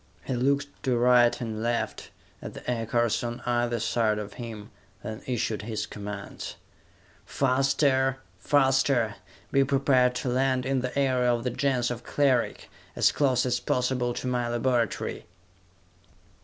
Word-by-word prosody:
He - - -3
looked 140 +3 0
to 125 -2 +1
right 120 0 +4
and 110 -3 -4
left, 120 +1 -2 0.3
at - - -8
the - - -10
aircars 120 -1 0
on 120 0 -4
either 120 -1 0
side 110 -1 +1
of 105 -1 -6
him, 115 -4 -8 0.3
then 110 0 -6
issued 115 -4 -1
his 110 0 -3
commands. 105 -1 -7 0.7
"Faster! 135 0 +2 0.2
Faster! 135 -5 +2 0.3
Be 135 -1 +4
prepared 135 -2 +3
to 125 - -2
land 130 0 +1
in 135 -1 0
the 125 +2 -4
area 130 -3 +2
of 120 -1 -1
the 125 - -1
Gens 125 -2 0
of 120 0 -5
Cleric, 135 -4 +1 0.3
as - - +4
close 130 -4 +2
as 125 - 0
possible 125 -1 0
to - - -5
my 125 -1 0
laboratory!" 120 -5 -1
125 Hz, 140 wpm, -27 LUFS, 120-130 Hz, 0.7 s, right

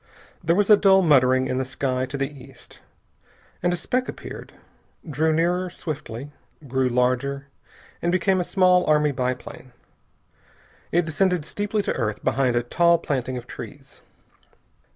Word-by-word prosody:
There 170 +1 +2
was 205 +2 +2
a 210 - +9
dull 195 -1 +5
muttering 130 -4 +4
in 130 0 -1
the - - 0
sky 130 0 -2
to 140 +1 -5
the 135 0 -1 0.2
east, 135 -2 -15 0.8
and 175 - +1
a - - +1
speck 250 +8 -1
appeared, - - -8 0.6
drew 155 +2 +1
nearer 175 +3 +1
swiftly, 145 -6 -7 0.4
grew 130 0 +1
larger, 130 +3 0 0.5
and 170 - 0
became 185 +1 +2
a - - +1
small 180 0 +3
army 150 -1 +3
biplane. 125 -1 -5 1.2
It 175 0 +2
descended 170 +1 0
steeply 205 +2 -2
to - - -1
earth 105 -2 -3
behind 125 0 +1
a 120 - +1
tall 170 +7 +3
planting 130 -4 -3
of 120 - -7
trees. - - -11
145 Hz, 150 wpm, -23 LUFS, 130-180 Hz, 1.2 s, a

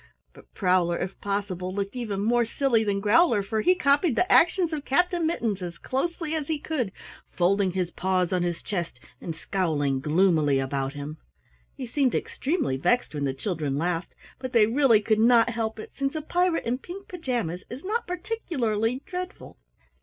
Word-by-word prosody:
But - - -18
Prowler, 180 -3 +2
if 185 +1 -5
possible, 195 -3 -2
looked 200 +2 -3
even 215 -6 -3
more 240 +3 +3
silly 235 0 +1
than 200 -2 -1
Growler, 220 - +4
for 215 +2 -1
he 365 +10 +4
copied 285 -2 +3
the 365 +7 +1
actions 340 -1 +4
of 295 -2 -3
Captain 350 +4 +1
Mittens 225 - -1
as 175 -2 -6
closely 320 +4 -2
as 310 -3 -2
he 315 - 0
could, 285 -8 -2 0.4
folding 190 +1 +1
his 180 -2 -1
paws 185 -1 0
on 180 - +1
his 175 -1 -2
chest 175 -10 -4 0.2
and 165 - -5
scowling 155 -7 -1
gloomily 155 -2 +3
about 135 0 -2
him. 145 +2 -6 0.6
He 265 - -4
seemed 260 +1 +1
extremely 275 - -1
vexed 245 - +1
when 145 -2 -2
the 135 - -1
children 150 -3 -2
laughed, 170 +2 -2 0.2
but 255 -1 -6
they 225 -3 +6
really 230 -1 +4
could 215 0 +1
not 235 +1 +5
help 225 -1 -2
it, 215 - -9
since 275 +2 -2
a 310 - -3
pirate 355 +1 +1
in 245 +2 -1
pink 385 +7 -9
pajamas 240 - -3
is 255 +4 -8
not 440 +5 -2
particularly 270 - -2
dreadful. 365 0 -7
220 Hz, 175 wpm, -26 LUFS, 180-285 Hz, 0.6 s, they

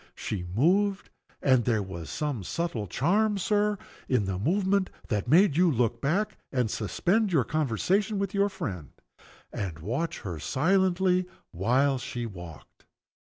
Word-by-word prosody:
She 90 -4 -4
moved 195 - +2 0.3
and 130 -3 +4
there 110 -4 +1
was 85 -4 -7
some 145 -9 -3
subtle 125 - -3
charm, 200 - +1
Sir, 210 +2 +1 0.3
in 125 -6 +2
the 95 -1 -2
movement, 190 - +1 0.2
that 105 -1 -1
made 165 +3 +5
you 175 +2 +4
look 120 -4 0
back, 185 +10 0
and 125 -5 0
suspend 190 - 0
your 150 -7 +3
conversation 155 - 0
with 200 0 -2
your 200 0 +2
friend, 90 - -6 0.6
and 95 -6 -4
watch 130 - -3
her 85 -5 -5
silently 185 - +2 0.2
while 130 +9 +2
she 120 -1 -4
walked. 85 -7 -11
140 Hz, 140 wpm, -28 LUFS, -, 0.6 s, made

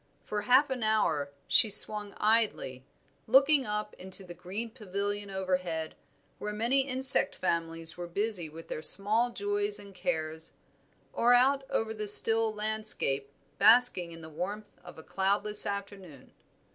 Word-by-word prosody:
For 210 0 -6
half 260 +6 +1
an 255 -2 -5
hour 210 -10 -2 0.2
she 220 - +4
swung 205 0 +3
idly, 210 - -2 0.4
looking 270 +2 +2
up 210 0 -6
into 190 +1 +2
the 175 -2 -12
green 190 +7 -9
pavilion 205 -2 -7
overhead, 180 -4 -5 0.5
where 210 - -7
many 235 +6 -1
insect 260 0 +5
families 165 -2 -3
were 175 0 -8
busy 190 -2 -3
with 165 +2 -14
their - - -8
small 210 +8 +3
joys 410 - -3
and 200 -1 -14
cares, 160 -2 -2 0.6
or 245 +1 +1
out 270 +2 0
over 220 0 -4
the 215 -1 -7
still 225 +2 +7
landscape 215 -10 -1 0.3
basking 215 -5 +4
in 165 0 -13
the 160 - -12
warmth 200 +7 -8
of 175 - -15
a 160 - -13
cloudless 205 +3 0
afternoon. 195 -8 -10
205 Hz, 145 wpm, -27 LUFS, 175-225 Hz, 0.6 s, still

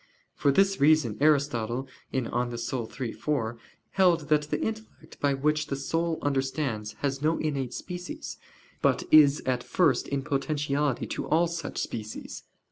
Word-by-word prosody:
For 140 - +2
this 195 +5 +3
reason 145 -7 +4
Aristotle 135 -4 +2 0.2
(De - - -2
Anima 120 0 -2
iii, 120 0 -3
4) 120 -6 -2 0.3
held 175 -6 +3
that 150 -1 +2
the 150 - 0
intellect 220 -7 -6
by 140 -1 +2
which 150 +2 +1
the 140 - -2
soul 165 +4 -1
understands 135 -6 -1
has 135 -1 -1
no 160 +2 +2
innate 140 -5 -2
species, 180 0 -6 0.4
but - - +2
is 150 -2 +7
at 125 -1 0
first 180 - +2
in 140 -1 -2
potentiality 145 -1 0
to - - -4
all 165 +3 +3
such 170 -2 -5
species. 110 -1 -5
145 Hz, 145 wpm, -28 LUFS, 130-155 Hz, 0.4 s, is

